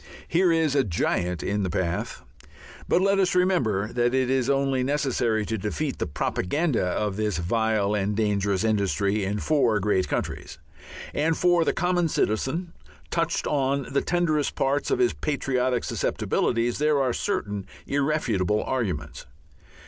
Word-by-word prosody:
Here 175 Hz, +1 st, +3 dB
is 160 Hz, -3 st, +2 dB
a 140 Hz, -2 st, +3 dB
giant 90 Hz, -2 st, -1 dB
in 105 Hz, +1 st, -1 dB
the 95 Hz, -, -1 dB
path.... 85 Hz, 0 st, -2 dB, 0.6 s
But 180 Hz, -, +3 dB
let 195 Hz, 0 st, +3 dB
us 185 Hz, -2 st, +2 dB
remember 125 Hz, -, +1 dB
that 120 Hz, +1 st, +1 dB
it 130 Hz, -1 st, +1 dB
is 130 Hz, -1 st, +1 dB
only 135 Hz, -1 st, +1 dB
necessary 125 Hz, -6 st, 0 dB
to 110 Hz, 0 st, -3 dB
defeat 130 Hz, +8 st, -3 dB
the -, -, -1 dB
propaganda 135 Hz, -, -1 dB
of 95 Hz, +2 st, -1 dB
this 105 Hz, -5 st, -1 dB
vile 105 Hz, +3 st, 0 dB
and 105 Hz, 0 st, -1 dB
dangerous 100 Hz, -2 st, 0 dB
industry 100 Hz, -1 st, +1 dB
in 100 Hz, +2 st, -1 dB
four 120 Hz, -3 st, +2 dB
great 95 Hz, -2 st, +1 dB
countries. -, -, -4 dB, 0.6 s
And 160 Hz, +2 st, +1 dB
for 175 Hz, -1 st, +3 dB
the -, -, +1 dB
common 180 Hz, -1 st, +1 dB
citizen, 155 Hz, -, -1 dB, 0.4 s
touched 165 Hz, 0 st, 0 dB
on 140 Hz, -1 st, 0 dB
the 140 Hz, -, +2 dB
tenderest 160 Hz, -4 st, 0 dB
part 140 Hz, +2 st, 0 dB
of 400 Hz, -, +2 dB
his 370 Hz, -1 st, +2 dB
patriotic 130 Hz, -4 st, -1 dB
susceptibilities, 120 Hz, +1 st, -1 dB
there 150 Hz, -1 st, +2 dB
are 130 Hz, -3 st, +1 dB
certain 105 Hz, -, -2 dB, 0.2 s
irrefutable 125 Hz, -, 0 dB
arguments. 90 Hz, -, -3 dB
125 Hz, 150 wpm, -25 LUFS, 105-150 Hz, 0.6 s, Here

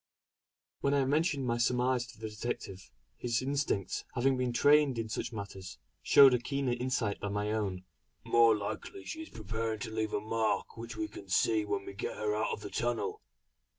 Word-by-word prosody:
When 140 Hz, 0 st, +2 dB
I 140 Hz, -2 st, +3 dB
mentioned 145 Hz, 0 st, +1 dB
my 120 Hz, -1 st, 0 dB
surmise 125 Hz, 0 st, +2 dB
to 120 Hz, -, -14 dB
the 110 Hz, -, -4 dB
detective, 105 Hz, -4 st, -5 dB, 0.3 s
his 120 Hz, 0 st, 0 dB
instinct 140 Hz, -8 st, -1 dB
having 135 Hz, +2 st, +3 dB
been 125 Hz, -1 st, 0 dB
trained 145 Hz, +1 st, +4 dB
in 115 Hz, -1 st, -3 dB
such 110 Hz, -, -3 dB
matters, 95 Hz, -4 st, -7 dB, 0.2 s
showed 135 Hz, -2 st, +8 dB
a 125 Hz, -, +3 dB
keener 135 Hz, +1 st, -1 dB
insight 120 Hz, -4 st, -1 dB
than 100 Hz, 0 st, -3 dB
my 105 Hz, +1 st, -1 dB
own: 100 Hz, -4 st, -2 dB, 0.4 s
"More 115 Hz, -2 st, +5 dB
likely 350 Hz, -, -6 dB
she 320 Hz, -, -5 dB
is 320 Hz, -, -9 dB
preparing 110 Hz, +1 st, -3 dB
to 110 Hz, -, -4 dB
leave 110 Hz, -1 st, -1 dB
a -, -, +1 dB
mark 110 Hz, +1 st, -1 dB
which 115 Hz, 0 st, -7 dB
we 325 Hz, -, -1 dB
can -, -, -11 dB
see 345 Hz, -3 st, +3 dB
when 395 Hz, 0 st, -2 dB
they 385 Hz, -, -7 dB
get 470 Hz, +5 st, -4 dB
her 430 Hz, -1 st, 0 dB
out -, -, 0 dB
of 460 Hz, -, -4 dB
the -, -, -7 dB
tunnel. 425 Hz, 0 st, -1 dB
120 Hz, 190 wpm, -32 LUFS, 110-145 Hz, 0.4 s, showed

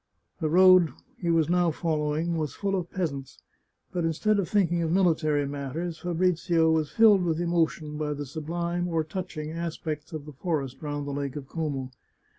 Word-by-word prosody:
The 155 Hz, -3 st, 0 dB
road 185 Hz, -1 st, +6 dB, 0.3 s
he 175 Hz, -, -2 dB
was 165 Hz, -2 st, +3 dB
now 175 Hz, 0 st, +3 dB
following 155 Hz, +1 st, -1 dB
was 155 Hz, -3 st, -2 dB
full 195 Hz, -1 st, -1 dB
of 180 Hz, -2 st, -3 dB
peasants, 140 Hz, -8 st, -4 dB, 0.5 s
but 175 Hz, -2 st, -1 dB
instead 200 Hz, +6 st, +1 dB
of 190 Hz, -, -1 dB
thinking 175 Hz, -5 st, +2 dB
of 160 Hz, -1 st, 0 dB
military 155 Hz, -5 st, +2 dB
matters, 145 Hz, +4 st, -4 dB
Fabrizio 175 Hz, -2 st, +2 dB
was 155 Hz, -2 st, +1 dB
filled 210 Hz, -4 st, +6 dB
with 165 Hz, -2 st, 0 dB
emo 170 Hz, -1 st, +3 dB
tion 150 Hz, -2 st, -8 dB
by 150 Hz, -1 st, -1 dB
the 145 Hz, 0 st, -5 dB
sublime 170 Hz, +4 st, -3 dB
or 165 Hz, -2 st, 0 dB
touching 155 Hz, -2 st, -5 dB
aspects 160 Hz, -2 st, -4 dB
of 155 Hz, -3 st, -6 dB
the 150 Hz, -, -10 dB
forest 140 Hz, -3 st, -3 dB
round 145 Hz, -1 st, -3 dB
the 145 Hz, -, -4 dB
Lake 140 Hz, -1 st, -3 dB
of 140 Hz, -3 st, -6 dB
Como. 140 Hz, -5 st, -3 dB
160 Hz, 180 wpm, -27 LUFS, 150-175 Hz, 0.5 s, road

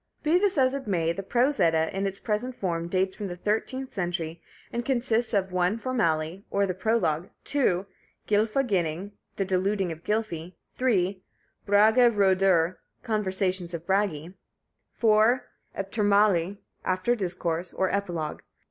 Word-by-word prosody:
Be 320 Hz, +4 st, +4 dB
this 395 Hz, -3 st, +1 dB
as 260 Hz, -1 st, +4 dB
it 275 Hz, -4 st, -5 dB
may, 170 Hz, -4 st, +1 dB
the 195 Hz, -, -5 dB
Prose 250 Hz, +8 st, +1 dB
Edda, 160 Hz, +1 st, +2 dB
in 195 Hz, +1 st, 0 dB
its 195 Hz, 0 st, -4 dB
present 230 Hz, +5 st, -2 dB
form, 170 Hz, -5 st, -2 dB
dates 190 Hz, +1 st, 0 dB
from 205 Hz, -, -5 dB
the 175 Hz, -, -5 dB
thirteenth 225 Hz, +7 st, -2 dB
century, 175 Hz, -3 st, -3 dB, 0.3 s
and 240 Hz, 0 st, -1 dB
consists 240 Hz, -2 st, 0 dB
of 195 Hz, -4 st, 0 dB
1. 180 Hz, +3 st, +1 dB
Formali -, -, -10 dB
(Fore 255 Hz, -, -2 dB
discourse); 165 Hz, -3 st, 0 dB
or 200 Hz, 0 st, +1 dB
the 185 Hz, -, -2 dB
prologue. 180 Hz, -5 st, 0 dB
2. 200 Hz, -10 st, +1 dB, 0.4 s
Gylfa 215 Hz, +5 st, +2 dB
ginning 180 Hz, -1 st, -1 dB, 0.2 s
(The 195 Hz, -, -1 dB
deluding 190 Hz, 0 st, 0 dB
of 165 Hz, +1 st, -8 dB
Gylfi). 185 Hz, -6 st, -2 dB, 0.2 s
3. 195 Hz, -7 st, +1 dB, 0.5 s
Braga 220 Hz, +5 st, +6 dB
roedur 190 Hz, -4 st, +3 dB, 0.3 s
(Conversations 190 Hz, -5 st, -1 dB
of 165 Hz, 0 st, -7 dB
Bragi). 190 Hz, -4 st, 0 dB, 0.6 s
4. 225 Hz, +3 st, +3 dB, 0.3 s
Eptirmali 200 Hz, -2 st, +2 dB, 0.3 s
(After 185 Hz, +6 st, +1 dB
discourse); 175 Hz, -4 st, -2 dB
or 190 Hz, -, 0 dB
Epilogue. 175 Hz, -6 st, -2 dB
195 Hz, 150 wpm, -27 LUFS, 175-220 Hz, 0.6 s, Braga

